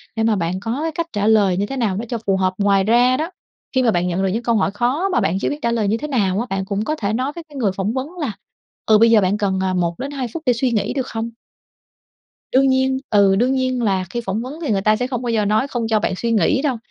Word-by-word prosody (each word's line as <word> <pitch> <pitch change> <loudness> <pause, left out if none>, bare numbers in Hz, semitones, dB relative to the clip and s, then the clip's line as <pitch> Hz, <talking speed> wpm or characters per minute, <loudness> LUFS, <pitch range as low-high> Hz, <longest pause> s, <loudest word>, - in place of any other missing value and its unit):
để 225 - 0
mà 225 -1 +3
bạn 180 +1 -2
có 225 +6 -3
cái 325 - -1
cách 335 +1 -3
trả 205 -1 0
lời 205 -5 +4
như 200 - 0
thế 270 +6 -5
nào 210 -6 0
đó 230 - -3
cho 235 - -2
phù 195 -1 +2
hợp. 185 0 +1
Ngoài 200 -1 +3
ra 245 +4 +4
đó, 325 +5 -3 0.4
khi 260 - +3
mà 230 - +3
bạn 180 -2 0
nhận 180 +2 -1
được - - +2
những 225 +6 -2
câu 235 -1 +1
hỏi 200 -2 +1
khó 255 - 0
mà 370 - +1
bạn 180 +4 0
chưa - - -1
biết 290 - -4
trả 235 - 0
lời 220 -3 0
như 220 +3 +1
thế 300 - -5
nào 205 -8 0
á, 240 - -1
bạn 195 0 -2
cũng 200 +2 -2
có 310 +6 -1
thể 205 -5 -2
nói 255 +5 -1
với 340 - -7
cái 290 - -14
người 225 -8 +1
phỏng 195 +4 -2
vấn 260 +2 -2
là, 280 -8 -1 0.5
ừ, 215 -1 +5
bây 230 +1 +5
giờ 215 -2 +6
bạn 190 +3 +1
cần, 195 -2 0
à, 185 -1 0
1-2 245 +11 -2
phút 320 - -5
để 250 - +4
suy 245 +1 0
nghĩ 210 -2 0
được 265 -2 -2
không? 225 0 -4 1.2
Đương 270 +1 +4
nhiên. 260 0 +2
Ừ, 200 -2 +4
đương 245 +5 +2
nhiên 255 -2 0
là 190 -3 +1
khi 240 - -3
phỏng 195 +4 -1
vấn 270 +6 -7
thì 290 - -2
người 195 - +2
ta 215 +1 +3
sẽ 250 - -1
không 250 -2 -4
bao 240 - -2
giờ 220 -2 +1
nói 215 +7 +1
không 235 -4 -2
cho 220 -1 +3
bạn 190 - -1
suy 230 +4 -1
nghĩ 225 - +2
đâu, 275 -5 0
225 Hz, 300 wpm, -20 LUFS, 200-255 Hz, 1.2 s, giờ